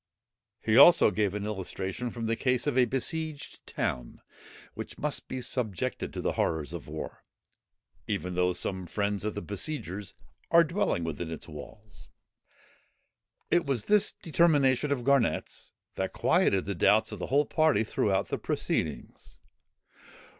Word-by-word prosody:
He - - -2
gave - - +7
also - - +7
an 105 -1 -1
illustration 95 +2 -4
from 115 -1 -5
the 115 +1 0
case 125 0 0
of 145 -4 0
a 130 -1 +5
besieged 150 +4 -4
town, - - -3 0.5
which - - -8
must 150 -1 -2
be 130 - -4
subjected 110 -8 -2
to - - -5
the - - 0
horrors 80 0 -1
of 85 -4 -7
war, 75 +1 -7 0.8
even 90 +3 -2
though 90 0 +1
some 95 0 -3
friends 100 +2 -1
of 105 0 -3
the 105 - -4
besiegers 100 - -5 0.3
are 170 0 +7
dwelling 165 - -1
within 80 +1 -4
its 80 - -7
walls. 100 +7 -12 1.4
It 175 -3 +3
was 130 -6 -1
this 210 -1 +4
determination 150 -5 +2
of 130 -4 0
Garnet's, 140 -2 0 0.3
that - - -2
quieted 95 -1 +2
the 100 - -2
doubts 105 +5 +3
of 105 - -7
the - - -4
whole 145 +2 +3
party 155 -10 +2
throughout 100 -3 0
the - - -2
proceedings. - - -3
105 Hz, 145 wpm, -29 LUFS, 95-140 Hz, 1.4 s, gave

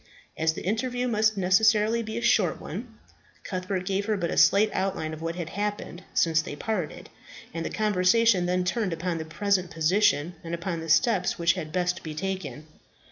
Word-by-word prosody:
As 160 0 +1
the - - -7
interview 245 +5 -1
must 215 -2 +2
necessarily 215 +4 +3
be 220 0 -5
a 235 - -3
short 195 -7 +2
one, 225 +6 -8 0.5
Cuthbert 185 -1 -3
gave 195 +2 -1
her 215 -2 +1
but 170 -3 -2
a - - -2
slight 210 +2 +5
outline 190 -5 -2
of 155 - -8
what 165 +1 -3
had 170 -2 -5
happened 205 -3 -4
since 160 -1 +3
they 150 - -7
parted, 185 -2 -4 0.5
and 165 0 -3
the - - -3
conversation 210 -1 +3
then 180 0 +1
turned 190 0 -1
upon 165 0 -3
the 160 - -5
present 185 +3 0
position, 170 0 +2
and 170 0 -3
upon 170 0 -4
the 165 0 -7
steps 190 +1 +2
which 170 0 +3
had 155 - -6
best 180 +1 -1
be 155 -3 -7
taken. 160 -6 -4
185 Hz, 190 wpm, -26 LUFS, 165-210 Hz, 0.5 s, slight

